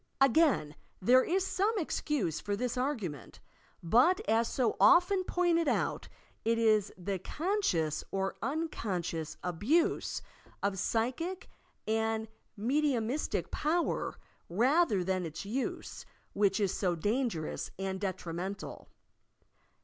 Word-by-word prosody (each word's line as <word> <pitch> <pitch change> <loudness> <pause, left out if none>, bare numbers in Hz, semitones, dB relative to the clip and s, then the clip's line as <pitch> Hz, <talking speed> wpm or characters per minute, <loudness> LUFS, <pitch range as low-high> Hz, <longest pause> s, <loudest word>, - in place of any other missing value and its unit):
Again 270 - +4 0.3
there 255 +6 +5
is 375 +2 +1
some 400 +3 +1
excuse 290 - -1
for 205 - -2
this 245 +3 -2
argument; 225 - -3 0.4
but 250 - +4
as 230 +1 +3
so 240 -3 0
often 365 +2 +5
pointed 345 -3 +1
out, - - 0 0.4
it 230 +1 +2
is 215 -3 +3
the 190 +1 -3
conscious 205 - -1
or 195 0 -2
unconscious 185 - -3
abtise 210 - +1 0.4
of 200 -1 0
psychic 260 - -1 0.4
and 220 0 0 0.3
medi 280 +7 +2
umistic 240 +5 -2
power 335 +3 0 0.3
rather 235 - +3
than 185 0 0
its 165 +2 -6
use, 245 +6 -4 0.3
which 200 -1 +2
is 200 -3 +1
so 180 -3 0
dangerous 205 -2 -1
and 190 0 -3
detrimental. 185 0 -5
225 Hz, 110 wpm, -31 LUFS, 190-300 Hz, 0.4 s, there